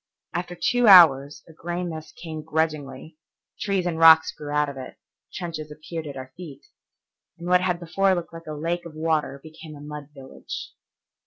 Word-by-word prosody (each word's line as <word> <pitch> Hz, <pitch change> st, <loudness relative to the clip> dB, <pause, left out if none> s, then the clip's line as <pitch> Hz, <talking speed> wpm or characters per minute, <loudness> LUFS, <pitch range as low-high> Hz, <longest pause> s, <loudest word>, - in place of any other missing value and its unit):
After 175 Hz, +1 st, -4 dB
two 245 Hz, -1 st, +2 dB
hours 150 Hz, -7 st, +7 dB
a 165 Hz, -, -15 dB
gray 175 Hz, +2 st, -4 dB
mist 160 Hz, -3 st, -7 dB
came 160 Hz, -2 st, -7 dB
grudgingly, 155 Hz, -1 st, -3 dB, 0.4 s
trees 195 Hz, -3 st, -1 dB
and 165 Hz, -2 st, -2 dB
rocks 160 Hz, -1 st, +7 dB
grew 150 Hz, -, -9 dB
out 150 Hz, 0 st, +1 dB
of 140 Hz, -, -7 dB
it, 130 Hz, -1 st, -9 dB, 0.3 s
trenches 160 Hz, -4 st, -6 dB
appeared 155 Hz, +1 st, -7 dB
at 140 Hz, -2 st, -7 dB
our 130 Hz, 0 st, -9 dB
feet, 160 Hz, -7 st, -11 dB, 0.7 s
and 170 Hz, +1 st, -8 dB
what 180 Hz, 0 st, +4 dB
had 180 Hz, -2 st, 0 dB
before 190 Hz, +3 st, +1 dB
looked 170 Hz, -1 st, -5 dB
like 165 Hz, 0 st, -11 dB
a 155 Hz, -, -5 dB
lake 170 Hz, +4 st, -3 dB
of 155 Hz, -, -13 dB
water 155 Hz, -3 st, -1 dB
became 160 Hz, -1 st, -11 dB
a -, -, -12 dB
mud 150 Hz, 0 st, -9 dB
village. 135 Hz, -2 st, -9 dB
160 Hz, 180 wpm, -24 LUFS, 150-175 Hz, 0.7 s, hours